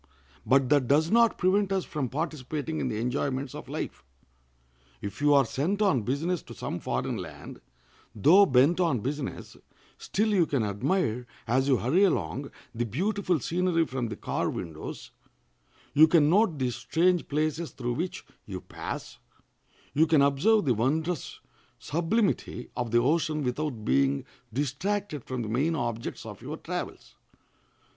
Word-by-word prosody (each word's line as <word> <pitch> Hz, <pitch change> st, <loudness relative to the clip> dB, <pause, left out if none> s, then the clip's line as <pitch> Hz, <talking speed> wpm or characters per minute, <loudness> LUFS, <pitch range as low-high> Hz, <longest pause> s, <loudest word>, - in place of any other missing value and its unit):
But 130 Hz, +1 st, +4 dB
that 145 Hz, -4 st, +3 dB
does 155 Hz, +6 st, +3 dB
not 235 Hz, 0 st, +4 dB
prevent 195 Hz, +2 st, +2 dB
us 190 Hz, -2 st, 0 dB
from 140 Hz, -5 st, -3 dB
participating 155 Hz, +1 st, -3 dB
in -, -, -1 dB
the 105 Hz, -, -2 dB
enjoyments 130 Hz, +2 st, -2 dB
of -, -, -9 dB
life. 70 Hz, 0 st, -5 dB, 1.0 s
If 100 Hz, +7 st, -7 dB
you 145 Hz, 0 st, +5 dB
are 140 Hz, -2 st, +5 dB
sent 165 Hz, -, -1 dB
on 190 Hz, -, +3 dB
business 150 Hz, -, -1 dB
to -, -, -12 dB
some -, -, -4 dB
foreign -, -, -2 dB
land, -, -, -9 dB, 0.5 s
though 180 Hz, -, +6 dB
bent 135 Hz, +7 st, +4 dB
on 165 Hz, -, +2 dB
business, 140 Hz, +3 st, -5 dB, 0.4 s
still 215 Hz, +3 st, 0 dB
you 185 Hz, -6 st, +3 dB
can 135 Hz, -6 st, 0 dB
admire, 120 Hz, -, -1 dB, 0.2 s
as 130 Hz, +4 st, +1 dB
you 135 Hz, -3 st, +4 dB
hurry 150 Hz, -, +2 dB
along, 85 Hz, -, 0 dB, 0.2 s
the 120 Hz, -, -1 dB
beautiful 185 Hz, -, 0 dB
scenery 170 Hz, +2 st, +1 dB
from 130 Hz, -4 st, -3 dB
the 110 Hz, -, -5 dB
car -, -, -2 dB
windows; 80 Hz, -3 st, -6 dB, 0.8 s
you 155 Hz, +2 st, +8 dB
can 155 Hz, -2 st, +4 dB
note 195 Hz, -4 st, +3 dB
the 130 Hz, -2 st, 0 dB
strange 170 Hz, +9 st, +1 dB
places 155 Hz, +2 st, -1 dB
through 120 Hz, -1 st, -3 dB
which 170 Hz, +8 st, -4 dB, 0.2 s
you -, -, -5 dB
pass; -, -, -7 dB, 0.7 s
you 160 Hz, +3 st, +4 dB
can 155 Hz, -3 st, +5 dB
observe 170 Hz, +10 st, +3 dB
the 130 Hz, -, +3 dB
wondrous 155 Hz, +10 st, -1 dB, 0.4 s
sublimity 170 Hz, -, -1 dB
of 120 Hz, -1 st, -2 dB
the 120 Hz, -, +3 dB
ocean 155 Hz, +4 st, +1 dB
without 125 Hz, -3 st, -3 dB
being 70 Hz, +1 st, +2 dB, 0.3 s
distracted 150 Hz, -, -2 dB
from 130 Hz, -2 st, -4 dB
the -, -, -5 dB
main 140 Hz, +9 st, +1 dB
objects 120 Hz, -5 st, -4 dB
of -, -, -9 dB
your -, -, -6 dB
travels. -, -, -6 dB
145 Hz, 150 wpm, -28 LUFS, 125-170 Hz, 1.0 s, you